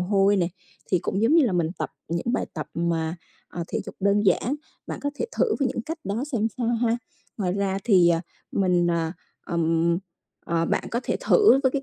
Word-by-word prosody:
hôi 195 +2 +3
này, 175 -2 +1 0.4
thì 185 - +4
cũng 195 +4 -2
giống 235 +8 +4
như 330 -3 +6
là 215 - 0
mình 170 -3 +1
tập - - -2 0.2
những 170 +8 -1
bài - - 0
tập - - -4
mà, 165 -1 -1 0.3
ờ, 170 - -5
thể - - -2
dục - - -7
đơn 200 +1 +3
giản. 235 +8 +2 0.3
Bạn - - -5
có 285 - 0
thể - - -2
thử 455 - +3
với 275 -2 +2
những 235 - -3
cách 320 +6 -5
đó 215 +6 -2
xem 220 -3 +1
sao 240 - 0
ha. 230 0 +2 0.4
Ngoài 185 -4 0
ra 195 0 0
thì, 185 -7 +6
à, 165 -1 +3 0.3
mình, 180 -3 +2
à, 165 -1 0 0.3
ừm, 170 0 +1 0.5
ờ, 165 0 +1
bạn - - 0
có 235 - 0
thể - - -1
thử 415 - +5
với 260 - +4
cái 280 - -1
195 Hz, 220 wpm, -25 LUFS, 170-235 Hz, 0.5 s, như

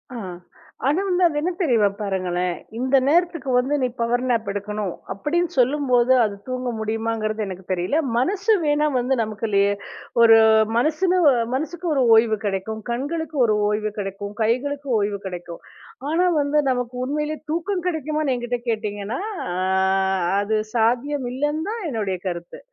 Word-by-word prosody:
ஆஹ்! 185 -6 -6 0.5
ஆனா 300 +6 +2
வந்து, 365 0 +1
அது 305 - -4
என்ன 360 +3 0
தெரியுமா, 235 -10 +3
பாருங்களேன்! 180 -3 -1 0.2
இந்த 260 +2 +3
நேரத்துக்கு 335 -3 +1
வந்து, 260 +4 +1
நீ 255 - +2
பவர் 240 +1 +1
நேப் 225 -4 0
எடுக்கணும்! 205 -2 -3 0.2
அப்படின்னு 330 - -1
சொல்லும்போது 255 -1 +3
,அது 205 - -3
தூங்க 255 -1 -2
முடியுமாங்கறது 220 0 -2
எனக்குத் 185 0 -7
தெரியல. 180 - 0 0.2
மனசு 390 - +2
வேணா 300 0 +2
வந்து, 260 +2 +1
நமக்குள்ளயே 210 -2 +1 0.5
ஒரு 225 -1 +8 0.4
மனசு 310 +8 +1 0.5
மனசுக்கு 340 +5 -4
ஒரு 265 - +3
ஓய்வு 220 -1 +4
கெடைக்கும். 205 +3 -3
கண்களுக்கு 300 +5 -3
ஒரு 215 -1 +2
ஓய்வு 215 0 -1
கெடைக்கும். 200 0 -5
கைகளுக்கு 280 +5 -1
ஓய்வு 200 -1 -1
கெடைக்கும். 175 -2 -7 0.5
ஆனா 355 +3 +2 0.2
வந்து, 285 +1 0
நமக்கு 250 0 -3
உண்மையிலே 300 +2 -2
தூக்கம் 360 +2 -2
கெடைக்குமான்னு 305 -4 -1
என்கிட்ட 245 0 -3
கேட்டீங்கன்னா, 215 - -3 0.3
அ - - -3 0.9
அது 215 +2 -1 0.2
சாத்தியம் 245 +4 +1
இல்லன்னு 295 +4 -1
தான் 450 -2 -4
என்னுடைய 205 -6 -2
கருத்து. 175 -1 -7
245 Hz, 140 wpm, -22 LUFS, 210-295 Hz, 0.9 s, ஒரு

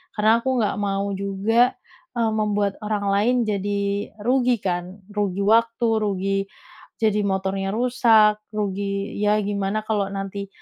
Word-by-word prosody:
Karena 220 +2 +4
aku 255 -1 0
nggak 210 - 0
mau 200 0 -1
juga, 200 +5 +1 0.4
eee, 230 -2 +1
membuat 210 -2 0
orang 210 -1 -2
lain 215 +5 +2
jadi 200 -1 -2
rugi 250 0 +3
kan? 180 +2 -3
Rugi 200 -2 -1
waktu, 230 +2 +3
rugi 195 -2 -1 0.6
jadi 215 -2 +1
motornya 195 +1 -1
rusak, 225 -3 +4 0.2
rugi 200 0 -2
ya 210 0 +3
gimana 200 +1 -2
kalau 210 -3 0
nanti 195 0 -5
205 Hz, 130 wpm, -23 LUFS, 195-220 Hz, 0.6 s, Karena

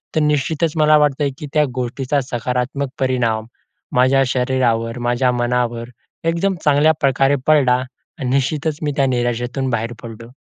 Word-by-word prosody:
तर - - +3
निश्चितच 150 +2 +1
मला 155 0 +5
वाटतंय, 145 -1 +1
की 150 - -6
त्या 150 -1 +3
गोष्टीचा 130 +3 -1
सकारात्मक 125 +3 -2
परिणाम 120 -4 0 0.5
माझ्या 130 +2 +4
शरीरावर, 125 -2 0
माझ्या 120 +1 +1
मनावर 120 -1 -1 0.4
एकदम 170 +4 +1
चांगल्याप्रकारे 145 -2 +3
पडला 130 -5 +4 0.4
आणि 130 -2 -2
निश्चितच 145 +3 0
मी 150 - 0
त्या 140 - +3
निराशेतून 120 +1 -1
बाहेर 115 +1 -2
पडलो. 115 0 -9
130 Hz, 130 wpm, -19 LUFS, 120-145 Hz, 0.5 s, मला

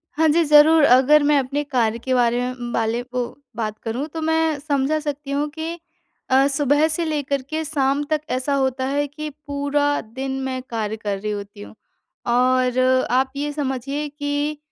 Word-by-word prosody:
हाँ 320 +1 +3
जी, 335 +3 +4
ज़रूर 300 +1 +6
अगर 280 +3 +6
मैं 290 0 +4
अपने 275 +2 -2
कार्य 240 -6 0
के 260 +2 -2
बारे 240 -1 +2
में 250 -1 -4
बाले 225 +1 0
को 250 -1 -3 0.3
बात 215 -2 -3
करूँ 245 +6 -3
तो 320 - -4
मैं 320 -1 +1
समझा 290 +1 0
सकती 290 -1 -5
हूँ 290 +1 0
कि 330 +2 -4 0.5
अ, 265 +1 +5
सुबह 290 +2 +2
से 325 +2 -1
लेकर 285 -3 -1
के 315 0 -2
शाम 280 -1 0
तक 305 -1 +1
ऐसा 260 +3 -1
होता 265 -1 0
है 285 +1 0
कि 305 +2 -6 0.2
पूरा 285 0 0
दिन 260 +5 -6
मैं 260 -1 -3
कार्य 220 -2 -2
कर 205 -2 -3
रही 210 +1 -3
होती 205 0 -7
हूँ। 205 - -11 0.5
और 255 +1 +2 0.3
आप 260 +1 +2
ये 290 +1 -2
समझिए 280 +1 -3
कि 290 +1 -2
280 Hz, 180 wpm, -21 LUFS, 250-295 Hz, 0.5 s, ज़रूर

